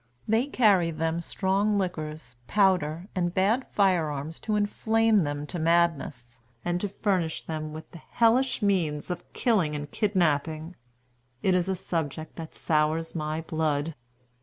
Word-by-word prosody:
They 225 +5 +2
carry 205 -11 +4
them 165 +1 -1
strong 200 +4 +1
liquors, 155 -8 -4
powder, 185 -4 +2
and 175 -2 0
bad 210 +7 +2
fire 185 -6 +2
arms 150 +3 -5
to 215 -1 -1
inflame 220 +1 +2
them 145 -3 -2
to 170 +4 -5
madness, 160 -8 +1 0.3
and 175 0 0
to 205 - -1
furnish 185 -5 -1
them 155 -1 -4
with 155 0 -9
the 170 - -10
hellish 240 +5 +2
means 175 -6 0
of 175 0 -6
killing 185 -11 +1
and 145 0 -5
kidnapping. 165 -4 0 0.7
It 190 - +3
is 180 0 +1
a 190 - +1
subject 160 -3 -4
that 165 -1 -8
sours 155 +1 0
my 155 0 -2
blood. 160 -1 -1
170 Hz, 145 wpm, -27 LUFS, 155-195 Hz, 0.7 s, carry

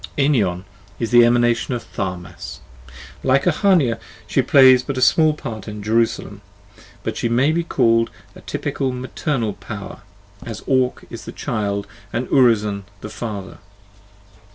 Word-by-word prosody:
Enion 110 -11 +2 0.4
is 115 0 -2
the 120 0 +8
Emanation 120 +1 +2
of 120 - -5
Tharmas: 90 -2 -6 0.6
like 135 +1 +3
Ahania, 170 - +3 0.3
she - - +1
plays 130 -2 +6
but 135 0 -5
a - - 0
small 155 +4 +4
part 110 -7 -7
in 105 -1 -7
"Jerusalem," 115 +2 0 0.6
but - - -3
she 120 - -1
may 130 +6 +3
be 170 +1 0
called 115 -7 +2 0.2
the - - -14
typical 135 -2 -2
maternal 125 -2 -2
power, - - -8 0.4
as 115 -4 -7
Ore 130 -2 +2 0.2
is - - -8
the - - -6
child 100 -2 -2 0.3
and 120 +2 -2
Urizen 105 -6 +3 0.2
the 105 - -7
father. 105 -4 -6
120 Hz, 140 wpm, -20 LUFS, 105-130 Hz, 0.6 s, the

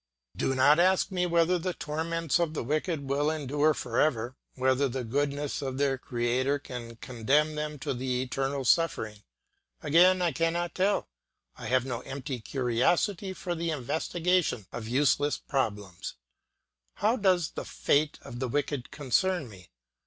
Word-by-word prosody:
Do 135 - 0
not 145 +4 +5
ask 185 +2 +3
me 180 -1 0
whether 170 +1 +3
the 180 +1 -3
torments 165 +1 -1
of 165 -2 0
the - - -2
wicked 150 +2 -1
will 145 +2 +1
endure 150 0 +1
for 120 -1 -2
ever, 125 -4 +1 0.2
whether 130 +1 +2
the 130 +1 -3
goodness 145 +4 -1
of 130 -2 -3
their 135 -2 +1
creator 125 +3 0
can 120 -4 -8
condemn 135 +7 +1
them 150 0 -4
to 140 0 -3
the 125 0 -1
eternal 135 +1 -2
suffering; 110 -9 +1 0.6
again, 175 +5 +5
I 175 -2 +2
cannot 165 +3 0
tell, 195 +2 +1 0.5
and 120 - -7
I - - -4
have 130 0 +2
no 120 -3 -3
empty 130 0 -5
curiosity 140 - 0
for 180 -1 -4
the 170 0 -2
investigation 160 - 0
of 110 -2 -6
useless 145 +3 +2
problems. 105 -9 -3 0.8
How 220 +4 +2
does 185 -7 +2
the - - -5
fate 150 +1 +1
of 120 - -8
the 130 - -1
wicked 140 0 -2
concern 155 +4 0
me? 95 -7 -14
145 Hz, 155 wpm, -29 LUFS, 125-165 Hz, 0.8 s, not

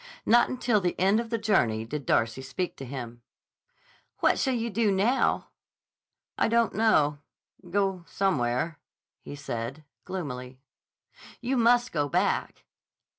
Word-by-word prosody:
Not 240 +2 +5
until 240 -4 +1
the 180 -1 -2
end 195 +4 +4
of 230 -1 -4
the 230 - 0
journey 120 - +1
did 145 +2 -6
Darcy 115 +3 +1
speak 135 +7 -4
to 135 - -7
him. 120 -3 -7 1.0
"What - - +2
shall 265 -2 +1
you 230 0 -2
do 210 0 +2
now?" 210 +7 +1 0.9
"I - - +3
don't 230 0 +2
know. 150 -10 +3 0.5
Go 195 -1 0
somewhere," 150 -4 0 0.6
said 125 -2 -5
he 155 - -19 0.2
gloomily. 130 -9 -6 0.8
"You 250 +2 -1
must 245 +1 +3
go 145 -3 0
back." - - 0
185 Hz, 130 wpm, -27 LUFS, -, 1.0 s, Not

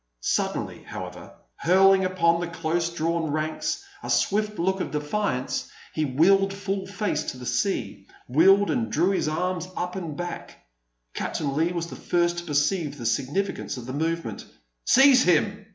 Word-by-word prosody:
Suddenly, - - -1
however, - - -8 0.3
hurling 190 +2 +5
upon 170 -2 +2
the 175 - -2
close 170 0 -1
drawn 165 -1 -1
ranks 155 - -2 0.2
a - - -7
swift 210 0 +1
look 190 +3 0
of - - -2
defiance, 150 -2 -2 0.2
he 155 - 0
wheeled 195 +9 +3
full 195 -1 -3
face 205 +1 -2
to - - -5
the 125 - -9
sea; 125 - -2 0.2
wheeled, 195 +10 +5
and 235 -3 -1
drew 175 +6 +2
his 190 - 0
arms 180 +2 -1
up 180 +1 -3
and 165 -6 -5
back. 175 0 -6 0.6
Captain 140 -3 -2
Leigh 165 +3 +1
was 170 -1 -2
the 170 - -9
first 175 0 0
to 175 - -9
perceive 145 0 0
the 120 - -7
significance 135 - -1
of 125 - -7
the 130 - -6
movement. 165 +3 -2 0.4
"Seize 265 0 +7
him!" 200 +3 +1
170 Hz, 160 wpm, -25 LUFS, 155-195 Hz, 0.6 s, Seize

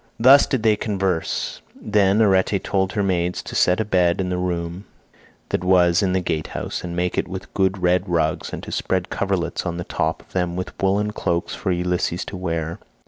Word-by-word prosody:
Thus 135 +4 +7
did 130 -5 -1
they 110 -2 +4
converse. 95 -5 -2 0.2
Then 105 0 +3
Arete 95 0 +3
told 95 0 0
her 105 -1 0
maids 90 -2 0
to - - -8
set 90 +3 +3
a 110 - 0
bed 90 -2 +2
in 90 -1 -1
the 90 - -1
room 90 +1 -3 0.6
that - - -1
was 90 -2 +4
in 95 -2 +1
the 95 - +2
gatehouse, 80 -3 -3
and 85 -1 -5
make 90 0 0
it - - -2
with 95 +1 -8
good 95 0 +1
red 90 +2 +2
rugs, 80 -2 0
and - - -6
to - - -7
spread 95 0 -1
coverlets 95 -3 -1
on 85 -2 -3
the 85 - -3
top - - -2
of - - -26
them 90 -2 -1
with 90 -1 -4
woollen 100 +2 +1
cloaks 85 -4 -2
for 95 - -2
Ulysses 90 0 -1
to - - -7
wear. 85 -2 -3
90 Hz, 200 wpm, -22 LUFS, 85-100 Hz, 0.6 s, Thus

